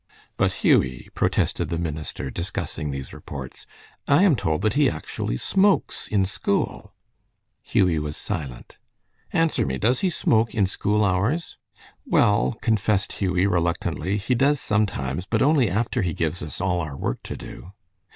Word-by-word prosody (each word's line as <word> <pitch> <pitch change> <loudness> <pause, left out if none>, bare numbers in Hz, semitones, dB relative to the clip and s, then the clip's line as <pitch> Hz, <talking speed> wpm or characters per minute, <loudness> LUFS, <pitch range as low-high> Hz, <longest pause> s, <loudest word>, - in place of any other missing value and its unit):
"But, - - +2
Hughie," 65 -1 +3
protested 85 -3 0
the 85 - -1
minister, 75 -5 -4
discussing 85 -2 -3
these 70 -2 -6
reports, - - -9 0.4
"I 145 +6 +5
am 185 -8 +5
told 80 -8 -1
that 110 -1 +2
he 145 -2 +4
actually - - -4
smokes 195 - +2
in 100 -3 +2
school." 100 +1 -2 0.7
Hughie 90 -5 +2
was 75 0 -4
silent. 75 -11 -6 0.5
"Answer 165 -1 +2
me! 65 -1 -2
Does 120 - +2
he 190 - +1
smoke 115 -9 +1
in 105 -4 +3
school 105 +2 +1
hours?" 100 - 0 0.4
"Well," 105 +2 +2
confessed 105 -3 +1
Hughie, 90 -1 +1
reluctantly, 85 0 0
"he 105 +5 0
does 140 +3 +3
sometimes, 90 - -1
but 110 +1 +1
only 140 -6 +4
after 115 +5 0
he 85 -4 -1
gives 80 +2 -1
us 75 - -6
all 90 -1 0
our 75 -4 -5
work - - -3
to - - -7
do." 90 - -10
95 Hz, 150 wpm, -24 LUFS, 80-115 Hz, 0.7 s, I